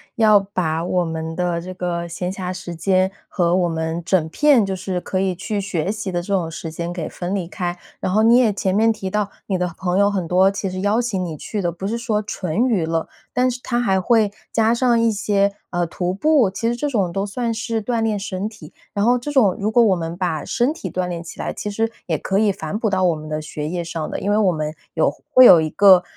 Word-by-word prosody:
要 215 -2 +6
把 180 -5 -2
我 180 0 +1
们 160 0 -4
的 175 -1 -1
这 185 +2 -7
个 175 -2 -3
闲 180 +2 -4
暇 185 -1 -4
时 185 -2 -7
间， 185 +3 +2 0.2
和 175 -2 +1
我 180 -2 +2
们 160 +1 -2
整 170 -4 +2
片 275 - +4
就 195 - -2
是 185 0 -3
可 185 - -2
以 190 -1 0
去 210 +4 -3
学 190 -2 -2
习 210 -2 -4
的 175 -1 -1
这 175 - -11
种 175 -4 0
时 165 0 -6
间 170 +2 -4
给 170 -3 -4
分 180 +1 -4
离 185 -4 -3
开。 175 -1 -4 0.2
然 - - -2
后 215 +2 +4
你 230 +2 +6
也 235 -5 +4
前 190 -1 -1
面 225 +3 +4
提 195 -3 -5
到， 210 +1 -1 0.2
你 190 - 0
的 180 0 0
朋 180 0 -1
友 200 0 +4
很 190 -4 -2
多 185 +3 +4
其 195 0 -3
实 185 0 -5
邀 205 +4 +2
请 215 -6 -2
你 165 -3 -5
去 205 +7 -4
的 175 -2 0
不 175 +3 -5
是 225 +3 -1
说 230 -3 -1
纯 200 0 -1
娱 200 -10 +1
乐， 165 0 -1 0.3
但 250 +1 +2
是 250 - -6
他 240 -1 -1
还 195 -5 +2
会 215 +1 +3 0.2
加 225 0 +3
上 240 -1 +3
一 230 0 +3
些， 200 -1 +1 0.2
呃， 175 -1 0
徒 180 +2 -2
步， 275 +1 +3
其 195 +4 -3
实 240 - -1
这 290 +5 -2
种 200 -9 0
都 195 +3 -1
算 230 +3 -2
是 225 0 -2
锻 230 +1 -1
炼 220 -2 0
身 195 0 -3
体。 215 -1 -12 0.2
然 205 0 +1
后 245 +1 +4
这 250 +5 -5
种 225 -10 +4
如 210 +2 0
果 235 +1 +5
我 200 -4 +4
们 165 -1 -4
把 170 -5 -2
身 255 +4 +1
体 195 - -6
锻 180 +1 -2
炼 170 -1 -5
起 165 - -11
来， - - -2
其 210 - -5
实 225 +2 -1 0.2
也 160 -3 0
可 190 +6 0
以 210 -1 +3
反 160 0 -4
哺 225 - +1
到 190 -1 +1
我 175 -3 +3
们 155 0 -9
的 155 0 -3
学 150 -1 -5
业 175 +2 -3
上 165 -2 -4
的。 - - -4
因 205 - -1
为 210 - +3
我 205 -4 +3
们 155 -2 -3 0.2
有 - - +2 0.2
会 255 - +8
有 170 -8 +9
一 155 - -1
个， 190 0 +6
190 Hz, 275 characters per minute, -21 LUFS, 175-215 Hz, 0.3 s, 有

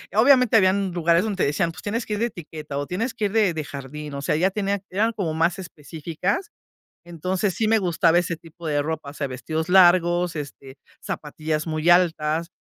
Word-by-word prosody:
obviamente 250 0 +5
habían 190 -1 +3
lugares 170 +2 +2
donde 200 -4 -1
te - - +3
decían: 165 +4 0
"Pues 180 - -12
tienes 225 +3 -2
que 210 - -4
ir 205 - -2
de 235 - +2
etiqueta, 155 -7 -8
o 145 - -3
tienes 225 +7 -2
que 215 - -2
ir 200 - -2
de 210 -6 +3
de 155 -1 -3
jardín". 145 +2 -8
O 140 - -5
sea, 150 +2 0
ya 185 +4 +3
tenían 200 -1 -2
eran 215 +5 +1
como 190 -8 -3
más 170 +3 +1
específicas. 175 - -4 0.6
Entonces, 185 +3 -2
sí 215 +4 0
me 225 0 +4
gustaba 175 -3 +2
ese 175 -1 0
tipo 165 +1 -14
de 145 -2 +1
ropa, 150 -2 -4
o - - -15
sea, 140 -2 -3
vestidos 155 +6 -4
largos, 175 -2 +4
este, 140 -2 -8 0.3
zapatillas 155 +1 -4
muy 155 +1 -2
altas, 165 -2 +2
170 Hz, 205 wpm, -23 LUFS, 155-195 Hz, 0.6 s, obviamente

